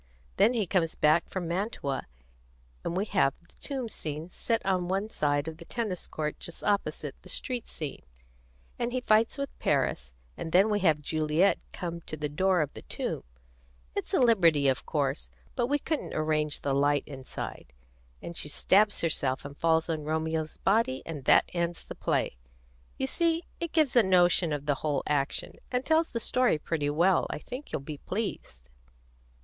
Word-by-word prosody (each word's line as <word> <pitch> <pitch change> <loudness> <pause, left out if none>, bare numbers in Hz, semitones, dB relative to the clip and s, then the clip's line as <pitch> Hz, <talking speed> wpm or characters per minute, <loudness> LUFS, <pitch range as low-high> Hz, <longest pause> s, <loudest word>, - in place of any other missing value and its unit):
Then 240 - +5
he 225 -4 +1
comes 165 -3 +1
back 155 +3 +3
from 185 -3 -3
Mantua, 170 - -2 0.8
and 170 - -2
we 195 - +1
have 180 -10 +2
the 170 - -24
tomb 265 -4 -3
scene 155 -5 -4
set 230 +5 0
at 190 -2 +2
one 190 +4 -1
side 145 -7 0
of 160 -1 -5
the 170 - -11
tennis 210 -5 -3
court 150 -1 -3
just 170 - -7
opposite 205 -1 0
the - - -11
street 250 -4 -1
scene; 150 -3 -5 0.8
and 240 0 -1
he 255 - +1
fights 225 0 +3
with 280 -1 -3
Paris; 65 -1 0 0.2
and 160 - -6
then 195 +4 +5
we 205 - +2
have 160 -6 +3
Juliet 155 +5 +2
come 170 -2 -5
to 155 - -4
the 150 0 -2
door 185 +3 +2
of 145 -2 -2
the - - -9
tomb - - -3 0.7
it's - - -3
a - - +3
liberty, 170 - +5
of 130 -1 0
course; 135 - -1 0.3
but 240 - +1
we 290 +2 +2
couldn't 310 +1 -3
arrange 155 -1 0
the 140 - 0
light 145 +1 +3
inside 130 - -7 0.5
and 170 - -6
she 150 - +1
stabs 205 +7 +3
herself 135 -5 0
and 140 0 -7
falls 160 +1 +2
on 160 -3 -2
Romeo's 160 0 -2
body, 195 - +1
and 150 -5 -6
that - - +6
ends 170 -1 -2
the - - -7
play. - - -1 0.6
You - - 0
see, 335 - +1 0.2
it 340 -2 -3
gives 310 -6 +2
a 240 - +8
notion 180 -3 +4
of 145 -1 -2
the 145 -1 +2
whole 145 -3 0
action, 140 -1 -1
and 250 +1 0
tells 320 +1 +3
the 230 - -3
story 250 -5 +2
pretty 150 -1 -1
well. 170 +5 +3
I - - -3
think 250 - -8
you'll - - -2
be 145 +1 -7
pleased." 185 - -4
170 Hz, 180 wpm, -29 LUFS, 150-210 Hz, 0.8 s, a